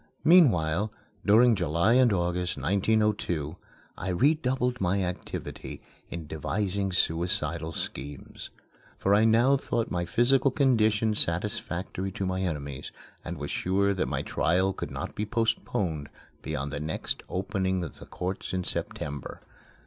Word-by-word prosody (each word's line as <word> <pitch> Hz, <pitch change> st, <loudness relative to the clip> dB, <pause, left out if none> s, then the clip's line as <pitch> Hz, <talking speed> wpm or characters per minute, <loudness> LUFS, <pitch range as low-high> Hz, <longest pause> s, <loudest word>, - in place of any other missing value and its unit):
Meanwhile, 105 Hz, -, +5 dB, 0.3 s
during 115 Hz, +4 st, +6 dB
July 85 Hz, +2 st, +2 dB
and 125 Hz, -2 st, +5 dB
August, 90 Hz, -2 st, 0 dB
1902, 95 Hz, -2 st, +1 dB, 0.4 s
I 95 Hz, -, -4 dB
redoubled 125 Hz, -, +1 dB
my 95 Hz, +1 st, +1 dB
activity 90 Hz, 0 st, -5 dB, 0.3 s
in 85 Hz, -2 st, -6 dB
devising 95 Hz, +6 st, -2 dB
suicidal 85 Hz, -2 st, 0 dB
schemes; 70 Hz, -2 st, -6 dB, 0.5 s
for 100 Hz, -, +2 dB
I 105 Hz, +2 st, +5 dB
now 120 Hz, +5 st, +5 dB
thought 115 Hz, -4 st, -2 dB
my 85 Hz, -1 st, -1 dB
physical 130 Hz, +8 st, +3 dB
condition 110 Hz, -5 st, +2 dB
satisfactory 95 Hz, 0 st, 0 dB
to 95 Hz, -, -3 dB
my 95 Hz, 0 st, -1 dB
enemies, 70 Hz, -6 st, -4 dB, 0.3 s
and 85 Hz, -1 st, -5 dB
was 75 Hz, 0 st, -5 dB
sure 100 Hz, +2 st, +1 dB
that 95 Hz, -1 st, -1 dB
my -, -, -2 dB
trial 95 Hz, +3 st, +1 dB
could -, -, -5 dB
not -, -, -5 dB
be 105 Hz, -, -3 dB
postponed 105 Hz, -8 st, -1 dB, 0.3 s
beyond 75 Hz, -2 st, -4 dB
the -, -, -3 dB
next 80 Hz, +1 st, -3 dB
opening 95 Hz, -1 st, -1 dB
of 80 Hz, -, -8 dB
the -, -, -11 dB
courts 95 Hz, +1 st, -4 dB
in 90 Hz, 0 st, -1 dB
September. 75 Hz, -4 st, -5 dB
95 Hz, 135 wpm, -28 LUFS, 85-110 Hz, 0.5 s, during